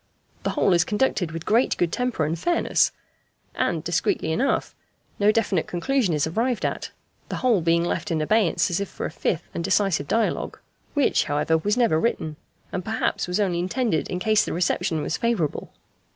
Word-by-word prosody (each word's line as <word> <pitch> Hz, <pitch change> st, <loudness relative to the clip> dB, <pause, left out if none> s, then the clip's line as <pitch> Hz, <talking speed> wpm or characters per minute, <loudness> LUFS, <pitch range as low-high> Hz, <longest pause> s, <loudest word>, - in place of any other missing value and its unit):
The -, -, -1 dB
whole 190 Hz, -, +2 dB
is 170 Hz, -1 st, +4 dB
conducted 210 Hz, -3 st, 0 dB
with 165 Hz, 0 st, -6 dB
great 235 Hz, +4 st, +2 dB
good 170 Hz, -2 st, +1 dB
temper 245 Hz, -10 st, 0 dB
and 155 Hz, -, -1 dB
fairness; 345 Hz, -, +2 dB, 0.6 s
and, -, -, -1 dB
discreetly 350 Hz, -, 0 dB
enough, 265 Hz, +12 st, 0 dB, 0.5 s
no 205 Hz, +1 st, +5 dB
definite 205 Hz, -6 st, 0 dB
conclusion 200 Hz, -, 0 dB
is 150 Hz, -, +1 dB
arrived 230 Hz, +8 st, -1 dB
at, -, -, -3 dB, 0.4 s
the -, -, -3 dB
whole 235 Hz, -7 st, +2 dB
being 170 Hz, +1 st, +2 dB
left 200 Hz, -, -2 dB
in 165 Hz, -2 st, 0 dB
abeyance 195 Hz, +2 st, +2 dB
as 175 Hz, -, 0 dB
if 200 Hz, -, -3 dB
for -, -, -5 dB
a -, -, -3 dB
fifth 160 Hz, -, -1 dB
and 170 Hz, -, -3 dB
decisive 190 Hz, -5 st, +1 dB
dialogue, 225 Hz, 0 st, 0 dB, 0.4 s
which, 285 Hz, -3 st, +3 dB
however, 150 Hz, +2 st, +1 dB
was 205 Hz, +8 st, 0 dB
never 230 Hz, -11 st, +3 dB
written, 155 Hz, -7 st, -1 dB, 0.3 s
and 180 Hz, -, -3 dB
perhaps 210 Hz, -2 st, -1 dB
was 180 Hz, +3 st, -1 dB
only 185 Hz, -4 st, +1 dB
intended 185 Hz, -, 0 dB
in 180 Hz, -, -2 dB
case 215 Hz, +3 st, +3 dB
the -, -, -3 dB
reception 165 Hz, -2 st, 0 dB
was -, -, -2 dB
favourable. 230 Hz, -, -1 dB
185 Hz, 180 wpm, -24 LUFS, 165-225 Hz, 0.6 s, no